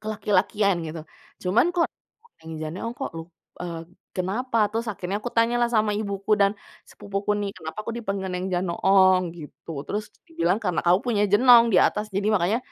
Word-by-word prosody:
kelaki-lakian 205 -2 +1
gitu. 160 +1 -6 0.4
Cuman 195 - +3
kok 340 - +4 0.6
Neng 160 0 -9
Janoong, 185 +9 -4
kok 270 - -3
lu 165 - -5 0.4
eee, 170 -2 -5 0.4
kenapa? 220 +7 -2 0.2
Terus 230 +1 -2
akhirnya 195 +1 -4
kutanyalah 240 0 +1
sama 215 -1 +3
ibuku 200 -1 -4
dan 200 0 +4 0.4
sepupuku 200 +1 -4
nih, 200 - -2
"Kenapa 160 +3 -8
aku 230 - -4
dipanggil 195 -4 -3
Neng 180 +1 -3
Janoong?" 185 +1 +3
gitu. 155 +1 -11 0.2
Terus 210 +1 -3 0.2
dibilang, 330 - +1
"Karena 180 -3 0
kamu 175 +1 +5
punya 215 -4 +1
jenong 240 +2 +7
di - - +4
atas, 210 - -2
jadi 200 +1 0
makanya 195 +5 +2
200 Hz, 160 wpm, -24 LUFS, 185-220 Hz, 0.6 s, jenong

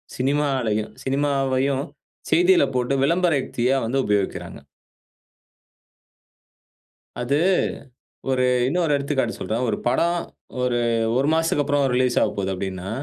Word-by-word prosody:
சினிமாலயும் 130 -6 0
சினிமாவையும் 135 -1 0 0.5
செய்தில 355 -1 +5
போட்டு 125 +2 0
விளம்பர 170 +3 +2
யுக்தியா 125 +1 0
வந்து 120 +4 -1
உபயோகிக்கிறாங்க. 100 -2 -2 2.6
அது, 130 +4 +1 0.9
ஒரு 130 -1 +1 0.2
இன்னொரு 165 +2 0
எடுத்துக்காட்டு 140 -1 -1
சொல்றேன். 115 +3 -2
ஒரு 105 - 0
படம் 170 +7 +1 0.4
ஒரு, 125 -1 +1 0.4
ஒரு 135 +2 +1
மாசத்துக்கு 160 -2 +1
அப்புறம் 145 0 +1
ரிலீஸ் 125 -1 +1
ஆகப்போது 95 -1 -1
அப்படின்னா, 95 0 -5
135 Hz, 100 wpm, -23 LUFS, 120-145 Hz, 2.6 s, செய்தில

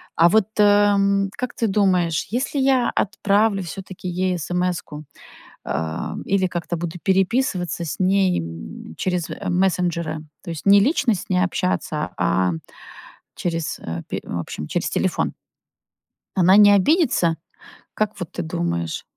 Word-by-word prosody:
А 165 - +6
вот, 220 +2 +4
э, - - +7
м, 200 -1 +4
как 250 -1 -3
ты 230 - 0
думаешь, 185 -5 +1
если 265 +3 -1
я 265 -2 +3
отправлю 205 0 +1
всё-таки 185 +1 -8
ей 180 +1 0
эсэмэску, 175 -3 -3 0.6
э, 80 0 -3
или 190 -1 +1
как-то 175 0 -3
буду 170 +1 -4
переписываться 190 - +1
с 160 - -5
ней, 190 0 +2
м, 80 -2 -8
через, 180 -3 -1
э, - - -5
мессенджеры, 175 -3 0 0.2
то - - -9
есть 165 - -7
не 200 0 +7
лично 250 - +2
с 185 - -6
ней 180 -1 +2
общаться, 180 -4 -1
а 90 0 +2 0.8
через, 165 -2 -3
э, 85 +1 -5
пе - - -2
в - - -5
общем, 75 -2 -6
через - - -1
телефон? - - 0 1.0
Она 185 +1 +5
не 205 -1 +8
обидится, 205 - +3 0.6
как 215 0 -2
вот 180 - -6
ты - - -4
думаешь? 85 - -3
185 Hz, 145 wpm, -22 LUFS, 165-200 Hz, 1.0 s, не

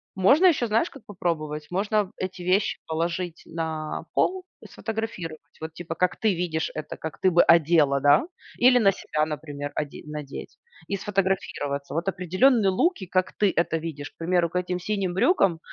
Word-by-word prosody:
Можно 275 - +5
ещё, 275 -9 +3
знаешь, 225 +10 +1
как 275 - -14
попробовать? 155 -6 -3
Можно 205 +1 0
эти 185 -1 -5
вещи 200 +2 +1
положить 170 +1 -3
на 160 -2 -4
пол 370 0 +1 0.2
и - - -10
сфотографировать. 215 -8 -6
Вот 160 0 -6
типа 165 -1 -6
как 180 +2 +1
ты 210 -4 +4
видишь 165 -2 -2
это, 155 - -6
как 160 -1 -6
ты 185 - +5
бы 175 0 +6
одела, 155 -4 +3
да? 145 - +5 0.4
Или 250 0 +7
на 200 -4 +5
себя, 155 -4 -1
например, 145 -2 -5
оде 145 -1 -8
надеть 150 -2 -7 0.4
и - - +1
сфотографироваться. 185 -8 -2
Вот 165 +4 -2
определённые 195 +5 +3
луки, 205 - +1
как 185 +1 0
ты 205 -2 +4
это 170 -1 +2
видишь, 150 -3 -6
к - - -44
примеру, 170 0 +1
к 180 - -3
этим 180 0 -3
синим 190 -1 -2
брюкам 190 - +3
175 Hz, 170 wpm, -25 LUFS, 160-195 Hz, 0.4 s, Или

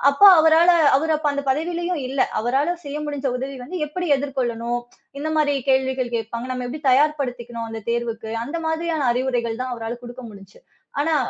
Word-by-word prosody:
அப்ப 280 - -5 0.2
அவரால 320 +2 +6 0.3
அவரு 315 +3 +1
அப்ப 300 -2 0
அந்தப் 280 -1 -3
பதவியிலயும் 345 +3 -1
இல்ல. 265 0 -2 0.2
அவரால 270 +9 +1
செய்ய 285 +1 -4
முடிஞ்ச 285 -2 -3
உதவி 270 +1 -5
வந்து 360 +6 -5
எப்டி 355 +3 -3
எதிர்கொள்ளணும்? 240 -4 -2 0.4
எந்த 315 - -2
மாரி 290 -2 +2 0.2
கேள்விகள் 260 -2 +1
கேட்பாங்க. 230 +2 -4
நம்ம 250 -1 -3
எப்டி 295 +4 -6
தயார்படுத்திக்கணும்? 250 -5 0
அந்தத் 225 -1 -7
தேர்வுக்கு. 230 -2 -3
அந்த 300 +7 -5
மாதிரியான 320 -3 -1
அறிவுரைகள் 245 -2 -1
தான் 255 - -4
அவரால 230 +1 -5
குடுக்க 245 +1 -9
முடிஞ்சுச்சு. 200 - -15 0.4
ஆனா, 315 +1 +2
265 Hz, 165 wpm, -22 LUFS, 240-305 Hz, 0.4 s, அவரால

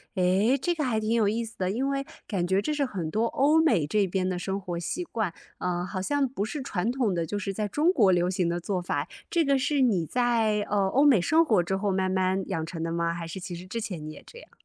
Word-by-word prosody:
哎， 190 +8 +3
这 350 +3 +1
个 305 -4 -2
还 225 -3 +1
挺 215 +1 -1
有 230 -3 +3
意 225 +3 0
思 225 -1 -9
的。 185 -1 -1
因 260 +7 -1
为 275 0 -1 0.2
感 180 -5 -1
觉 190 +2 +2
这 305 +7 -1
是 285 -2 +1
很 180 -10 -4
多 220 +5 +1
欧 295 +6 +3
美 185 - +3
这 200 +5 +1
边 185 0 -1
的 180 -1 -2
生 195 +2 -2
活 175 -3 -4
习 345 - -3
惯， 220 - -3 0.3
嗯， 175 0 -1
好 185 - -4
像 280 +7 +1
不 215 -5 -3
是 280 +7 -5
传 210 -4 -2
统 245 -7 0
的 170 -1 -1
就 205 +5 -3
是 195 -1 -3
在 210 +1 -2
中 310 - +2
国 210 - +4
流 175 0 +2
行 185 -2 0
的 170 +1 -1
做 185 0 -2
法。 145 -3 -2 0.2
这 335 - +2
个 275 -2 +2
是 290 0 +1
你 195 -10 +2
在， 230 -1 +1
呃， 200 -2 +2
欧 275 +8 +3
美 255 -9 +6
生 315 - +4
活 220 - +3
之 175 +3 -1
后 195 0 0
慢 190 0 0
慢 190 0 +1
养 165 -5 -2
成 165 0 -6
的 165 0 -2
吗？ 170 0 0
还 170 -1 -5
是 165 - -6
其 175 - -6
实 175 +2 -8
之 230 +4 -4
前 185 -8 -5
你 155 - -6
也 - - -13
这 475 - -13
样？ - - -17
200 Hz, 295 characters per minute, -27 LUFS, 180-250 Hz, 0.3 s, 美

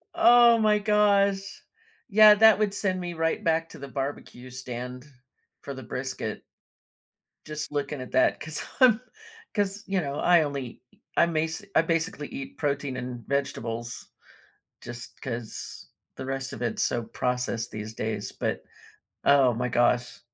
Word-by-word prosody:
Oh, 240 -7 +7
my 210 -1 +3
gosh. 200 -2 +2 0.5
Yeah, 210 0 +8
that 220 -1 +6
would 205 -2 +1
send 190 -2 -1
me 175 -1 -4
right 165 0 -1
back 165 0 +1
to 160 - -12
the 140 - -7
barbecue 135 -2 -5
stand 125 +1 -7 0.6
for 140 - -6
the 130 - -8
brisket 130 +3 -4 1.0
just 150 -1 -5
looking 145 -1 -3
at 130 - -8
that 130 - +3
'cause 155 -1 -5 0.2
I'm 245 -2 +6 0.5
'cause, 205 -1 -1
you 195 -1 +1
know, 140 -1 -4
I 170 +1 +4
only 140 -4 -5
ea - - -28 0.2
I - - +6
may 160 -1 0
se 160 +5 -7
I - - +7
basically 165 -2 -1
eat 135 - -8
protein 140 -2 -1
and 125 -2 -6
vegetables 120 -4 -3 0.8
just 120 0 -9
'cause 120 -3 -6 0.3
the 130 - -6
rest 135 0 -3
of 110 - -8
it's 120 - -1
so 120 - 0
processed 125 0 -2
these 110 +1 -7
days. 110 -2 -3
But - - -3 0.6
oh 135 -3 +5
my 125 +2 -1
gosh. 120 +1 +1
140 Hz, 155 wpm, -27 LUFS, 125-195 Hz, 1.0 s, Yeah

